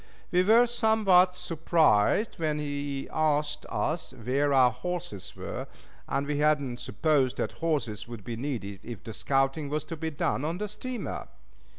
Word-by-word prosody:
We 180 Hz, -1 st, +4 dB
were 225 Hz, +6 st, +6 dB
somewhat 215 Hz, -6 st, +4 dB
surprised 165 Hz, -, +2 dB
when 155 Hz, -2 st, 0 dB
he 145 Hz, -2 st, -3 dB
asked 150 Hz, -1 st, 0 dB
us 155 Hz, -2 st, -2 dB
where 130 Hz, +5 st, 0 dB
our 130 Hz, -2 st, +6 dB
horses 170 Hz, -, -5 dB
were, -, -, -5 dB, 0.4 s
as 135 Hz, +1 st, 0 dB
we 145 Hz, 0 st, -1 dB
had 150 Hz, 0 st, +4 dB
not 125 Hz, -4 st, -5 dB
supposed 145 Hz, -5 st, +1 dB
that -, -, -1 dB
horses 140 Hz, -12 st, -1 dB
would 115 Hz, -4 st, -8 dB
be 115 Hz, +3 st, -4 dB
needed 110 Hz, -6 st, -4 dB
if 115 Hz, -6 st, -8 dB
the 110 Hz, -, -7 dB
scouting 135 Hz, +5 st, 0 dB
was 150 Hz, 0 st, -1 dB
to 165 Hz, +2 st, -6 dB
be 160 Hz, +1 st, -3 dB
done 145 Hz, -2 st, -1 dB
on 165 Hz, +3 st, -1 dB
the 210 Hz, +2 st, -3 dB
steamer. 235 Hz, +4 st, -5 dB
150 Hz, 165 wpm, -28 LUFS, 130-170 Hz, 0.4 s, were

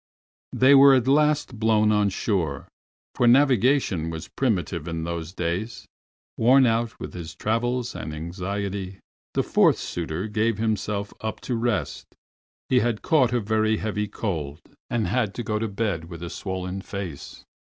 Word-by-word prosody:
They 130 Hz, +2 st, +5 dB
were 140 Hz, 0 st, +8 dB
at 130 Hz, -1 st, +1 dB
last 150 Hz, -4 st, +2 dB
blown 110 Hz, -1 st, +3 dB
on 105 Hz, -1 st, +3 dB
shore, 90 Hz, -, -2 dB, 0.5 s
for 120 Hz, -, +2 dB
navigation 125 Hz, -, +3 dB
was 80 Hz, +2 st, -7 dB
primitive 90 Hz, -, -1 dB
in 85 Hz, -1 st, -3 dB
those 85 Hz, -1 st, -4 dB
days. 90 Hz, +5 st, -3 dB, 0.5 s
Worn 130 Hz, +4 st, +5 dB
out 115 Hz, 0 st, 0 dB
with -, -, -7 dB
his 85 Hz, -3 st, -7 dB
travels 120 Hz, +3 st, -1 dB
and 75 Hz, -, -6 dB
anxiety, 95 Hz, +4 st, -4 dB, 0.4 s
the -, -, +2 dB
fourth -, -, +3 dB
suitor 85 Hz, +3 st, -4 dB
gave 110 Hz, 0 st, 0 dB
himself 105 Hz, -2 st, -2 dB
up 110 Hz, -1 st, -4 dB
to 125 Hz, -, -2 dB
rest. 115 Hz, -2 st, -2 dB, 0.6 s
He 125 Hz, -, +4 dB
had 120 Hz, -2 st, -1 dB
caught 130 Hz, -7 st, +3 dB
a 125 Hz, -, +1 dB
very 110 Hz, 0 st, +1 dB
heavy 105 Hz, -1 st, -2 dB
cold, 80 Hz, -8 st, -4 dB, 0.3 s
and 115 Hz, -3 st, 0 dB
had 110 Hz, +1 st, 0 dB
to 120 Hz, -, -4 dB
go 105 Hz, -1 st, -1 dB
to 115 Hz, -, -1 dB
bed 100 Hz, -5 st, -2 dB
with 85 Hz, 0 st, -9 dB
a 85 Hz, -, -5 dB
swollen 95 Hz, 0 st, -4 dB
face. 95 Hz, -8 st, -7 dB
105 Hz, 155 wpm, -24 LUFS, 90-120 Hz, 0.6 s, were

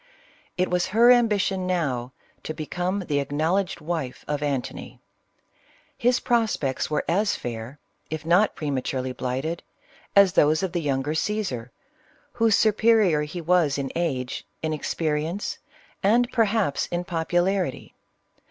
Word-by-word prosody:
It 185 Hz, 0 st, 0 dB
was 180 Hz, 0 st, +1 dB
her 240 Hz, +2 st, +8 dB
ambition 205 Hz, -6 st, +2 dB
now, 135 Hz, -9 st, -1 dB, 0.3 s
to 155 Hz, -, -5 dB
become 180 Hz, +5 st, -2 dB
the 150 Hz, -6 st, -1 dB
acknowledged 160 Hz, +7 st, -1 dB
wife 155 Hz, -5 st, -4 dB
of 150 Hz, -1 st, -2 dB
Antony. 140 Hz, -4 st, -4 dB, 1.0 s
His 245 Hz, +1 st, +2 dB
prospects 220 Hz, -, 0 dB
were 150 Hz, -, -1 dB
as 200 Hz, +5 st, +2 dB
fair, 120 Hz, +3 st, -6 dB, 0.3 s
if 155 Hz, 0 st, -5 dB
not 180 Hz, +6 st, +3 dB
prematurely 130 Hz, -3 st, -2 dB
blighted, 135 Hz, +7 st, -3 dB, 0.5 s
as 200 Hz, -2 st, +6 dB
those 155 Hz, +4 st, +3 dB
of 190 Hz, -, -1 dB
the 175 Hz, -1 st, -1 dB
younger 140 Hz, 0 st, -1 dB
Caesar, 160 Hz, -, -2 dB, 0.6 s
whose 225 Hz, -3 st, +3 dB
superior 215 Hz, -7 st, +4 dB
he 150 Hz, +4 st, -5 dB
was 165 Hz, -4 st, +2 dB
in 135 Hz, -1 st, -3 dB
age, 135 Hz, -7 st, -2 dB, 0.2 s
in 155 Hz, -, 0 dB
expe 155 Hz, +1 st, -1 dB
rience, 160 Hz, +7 st, -3 dB, 0.4 s
and, 235 Hz, +5 st, +3 dB
perhaps, 215 Hz, -, +1 dB
in 175 Hz, 0 st, -2 dB
popularity. 175 Hz, 0 st, -1 dB
170 Hz, 130 wpm, -25 LUFS, 145-200 Hz, 1.0 s, her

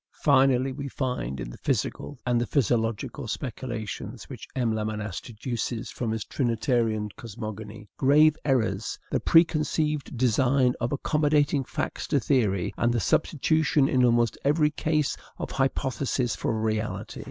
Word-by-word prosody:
Finally, 135 Hz, -2 st, +4 dB
we 140 Hz, +1 st, -5 dB
find 125 Hz, -, -3 dB
in -, -, -5 dB
the -, -, -12 dB
physical 145 Hz, -, -2 dB
and 120 Hz, -3 st, +1 dB
physiological 115 Hz, 0 st, 0 dB
speculations 115 Hz, -, -5 dB
which -, -, -8 dB
M. 120 Hz, -4 st, +1 dB
Lamennais 105 Hz, -3 st, -3 dB
deduces 115 Hz, 0 st, -4 dB
from 120 Hz, -, -3 dB
his 110 Hz, -1 st, -2 dB
trinitarian 115 Hz, -4 st, 0 dB
cosmogony 110 Hz, -1 st, -8 dB
grave 150 Hz, +3 st, +5 dB
errors, 110 Hz, -7 st, 0 dB
the -, -, +1 dB
preconceived 155 Hz, -4 st, +2 dB
design 125 Hz, +1 st, +3 dB
of 120 Hz, -, -1 dB
accommodating 145 Hz, 0 st, +2 dB
facts 150 Hz, +4 st, -4 dB
to 145 Hz, -, +2 dB
theory, 105 Hz, -8 st, +1 dB
and 120 Hz, -, +2 dB
the 120 Hz, -, +1 dB
substitution 155 Hz, -, +2 dB
in 130 Hz, -5 st, +3 dB
almost 120 Hz, -1 st, +3 dB
every 150 Hz, +1 st, +3 dB
case 155 Hz, -1 st, 0 dB, 0.2 s
of -, -, -5 dB
hypothesis 135 Hz, -2 st, 0 dB
for 110 Hz, -, -1 dB
reality. 110 Hz, 0 st, -2 dB
125 Hz, 130 wpm, -26 LUFS, 110-140 Hz, 0.2 s, grave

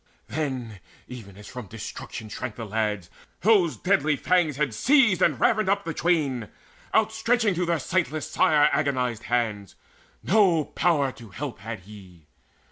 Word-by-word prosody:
Then, 130 Hz, -8 st, -4 dB, 0.3 s
even 100 Hz, -6 st, -10 dB
as 105 Hz, -, -12 dB
from 125 Hz, -4 st, -8 dB
destruction 110 Hz, +1 st, -8 dB
shrank 115 Hz, +1 st, -6 dB
the 115 Hz, -, -6 dB
lads, 105 Hz, -3 st, -2 dB, 0.3 s
Those 190 Hz, -6 st, +3 dB
deadly 180 Hz, -6 st, +2 dB
fangs 165 Hz, -1 st, +1 dB
had 140 Hz, -4 st, -1 dB
seized 240 Hz, -, +4 dB
and -, -, +3 dB
ravined 215 Hz, -4 st, +2 dB
up 200 Hz, 0 st, +1 dB
The 165 Hz, -, -3 dB
twain, 145 Hz, -10 st, 0 dB, 0.4 s
outstretching 220 Hz, 0 st, +2 dB
to 175 Hz, 0 st, -1 dB
their 170 Hz, -1 st, +2 dB
sightless 155 Hz, 0 st, -1 dB
sire 150 Hz, -1 st, +4 dB
Agonized 125 Hz, -6 st, 0 dB
hands: 110 Hz, -5 st, -1 dB, 0.5 s
no 180 Hz, -6 st, +3 dB
power 150 Hz, -5 st, +1 dB
to 120 Hz, -4 st, -13 dB
help 130 Hz, +6 st, -6 dB
had 110 Hz, 0 st, -7 dB
he. 90 Hz, -5 st, -14 dB
140 Hz, 145 wpm, -25 LUFS, 110-175 Hz, 0.5 s, seized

